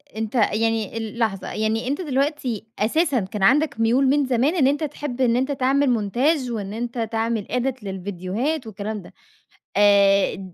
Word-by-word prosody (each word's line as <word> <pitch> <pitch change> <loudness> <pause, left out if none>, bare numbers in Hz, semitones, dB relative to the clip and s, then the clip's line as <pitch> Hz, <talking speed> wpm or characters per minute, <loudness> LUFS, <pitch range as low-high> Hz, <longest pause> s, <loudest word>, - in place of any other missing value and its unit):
أنتَ 220 +2 -4
يعني 225 -1 +1
ال 225 0 -5
لحظة، 210 -4 -1
يعني 220 +2 -1
أنتَ 285 +6 -1
دلوقتي 275 - -2
أساسًا 275 +4 +2
كان 195 +1 -4
عندك 285 +2 +3
مُيول 245 +4 +3
من 280 +1 +3
زمان 260 +7 +1
إن 275 -6 +3
أنتَ 290 +3 0
تحِب 280 -3 -4
إن 240 -2 +3
أنتَ 265 +3 0
تعمل 275 +1 +2
مونتاج 245 +5 +1
وإن 205 -3 -4
أنتَ 240 +2 -5
تعمل 225 -2 -1
edit 250 -1 -1
للفيديوهات 200 - -3
والكلام 210 0 -5
ده. - - -15 0.6
آآ، 200 -2 +3
230 Hz, 160 wpm, -22 LUFS, 210-270 Hz, 0.6 s, عندك